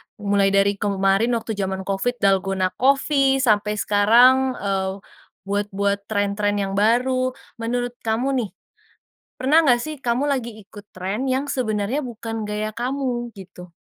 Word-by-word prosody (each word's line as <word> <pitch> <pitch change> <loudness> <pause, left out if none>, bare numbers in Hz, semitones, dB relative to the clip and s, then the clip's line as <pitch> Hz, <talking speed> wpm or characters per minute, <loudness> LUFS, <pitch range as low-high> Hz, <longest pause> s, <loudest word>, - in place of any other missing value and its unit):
mulai 200 -1 +1
dari 200 0 +2
kemarin 200 +3 +1
waktu 225 0 -4
zaman 190 -2 -3
Covid, 195 +6 -1
Dalgona 195 -1 +2
coffee 270 0 +3
sampai 210 -2 +2
sekarang, 240 +6 +4
eee, 195 -1 -3 0.4
buat-buat 200 0 -2
tren-tren 205 0 0
yang 195 +1 -2
baru. 255 +3 +2 0.2
Menurut 245 +1 -2 0.2
kamu 255 +4 0
nih, 215 - -3 0.9
pernah 295 +6 +4
gak 250 -6 +4
sih 310 +6 -5
kamu 245 +4 0
lagi 240 -6 -2
ikut 205 0 -14
tren 200 +8 -3
yang 265 +2 0
sebenarnya 245 0 -1
bukan 225 -2 -5
gaya 210 +1 -3
kamu 245 -1 -2
gitu? 180 -2 -12
215 Hz, 135 wpm, -22 LUFS, 200-255 Hz, 0.9 s, sekarang